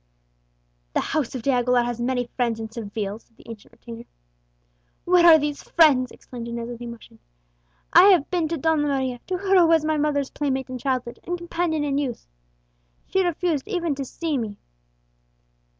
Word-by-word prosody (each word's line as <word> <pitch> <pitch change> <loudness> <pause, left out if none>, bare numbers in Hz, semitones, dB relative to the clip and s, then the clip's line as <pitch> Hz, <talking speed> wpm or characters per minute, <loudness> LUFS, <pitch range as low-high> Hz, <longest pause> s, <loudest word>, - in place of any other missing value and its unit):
"The - - +1
house 295 -5 -2
of 245 - -5
De 275 - +2
Aguilera 250 -1 +2
has 240 -1 -4
many 245 0 0
friends 235 -3 0
in 220 -1 -6
Seville," 210 -2 -5
said 230 - -32
the - - -19
ancient 225 -3 -11
retainer. 235 0 -11 1.0
"Where 350 -1 +5
are 325 -2 +9
these 295 -1 -3
friends?" 280 -7 +4
exclaimed 240 -2 -9
Inez 235 0 -5
with 240 -1 -8
emotion. 235 - -10 0.7
"I 365 - +9
have 365 -8 +5
been 345 -3 0
to 330 +1 -3
Donna 320 +1 +1
Maria 265 -3 -1
to 370 - -1
her 385 0 +3
who 340 - +5
was 325 -2 +3
my 310 0 +1
mother's 290 -2 0
playmate 265 -3 -2
in 255 - -5
childhood, 250 -2 -2
and 355 0 -3
companion 340 -2 -2
in 285 -1 0
youth. 260 -5 -4 0.8
She 380 0 +2
refused 345 -4 -1
even 345 -7 -1
to 275 0 -4
see 300 +2 -3
me!" 210 -3 -5
275 Hz, 180 wpm, -23 LUFS, 240-325 Hz, 1.0 s, are